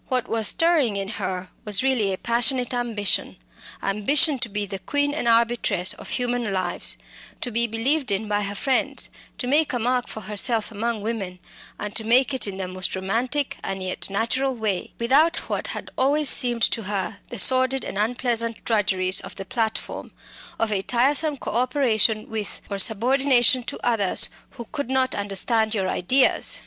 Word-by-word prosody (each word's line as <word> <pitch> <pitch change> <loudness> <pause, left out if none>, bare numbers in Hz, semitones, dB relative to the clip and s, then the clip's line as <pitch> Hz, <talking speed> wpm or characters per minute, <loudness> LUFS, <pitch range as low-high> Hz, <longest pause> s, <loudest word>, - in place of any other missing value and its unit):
What 255 -2 -1
was 225 -1 0
stirring 320 -10 +2
in 195 0 -3
her 185 -3 -4
was 210 +3 +1
really 245 -7 +1
a 190 - -3
passionate 240 +3 0
ambition 230 -5 -1 0.5
ambition 265 +9 +3
to 235 -2 -3
be 205 0 -3
the 195 0 -6
queen 285 - -1
and 290 - -2
arbitress 230 -5 +2
of - - -11
human 245 -3 -1
lives 185 -2 -1 0.4
to 245 - -3
be 235 +1 +2
believed 250 +4 0
in 200 +2 -1
by 205 0 0
her 200 0 -3
friends, 265 +5 0 0.3
to - - -2
make 295 +4 +2
a - - +1
mark 245 +1 0
for 220 - -7
herself 215 +3 0
among 220 0 -3
women, 205 -5 -4 0.4
and 210 0 -5
to 220 - +1
make 250 +5 +3
it 260 - +1
in 195 -1 -5
the 190 -1 -4
most 185 0 -3
romantic 240 +9 -1
and 195 -1 -4
yet 185 +1 -3
natural 250 +6 -1
way, 215 -5 -2
without 285 +9 +3
what - - -2
had - - -6
always 285 +2 +4
seemed 240 -2 +4
to 225 - +2
her 195 -1 -3
the 240 - -6
sordid 260 +4 +3
and 195 - -4
unpleasant 230 0 0
drudgeries 190 -4 +1
of - - -9
the 195 - -7
platform, 220 +2 -3 0.5
of 225 -1 0
a 200 -2 0
tiresome 280 +7 +1
co - - -5
operation 235 -4 +1
with, 215 -2 -4
or 200 - -3
subordination 250 +3 +3
to 235 - -5
others 225 -6 +3 0.2
who 240 -3 -8
could 285 -4 -4
not 260 -1 +1
understand 215 +3 +1
your 190 -3 -1
ideas. 255 +9 +2
230 Hz, 175 wpm, -23 LUFS, 205-255 Hz, 0.5 s, always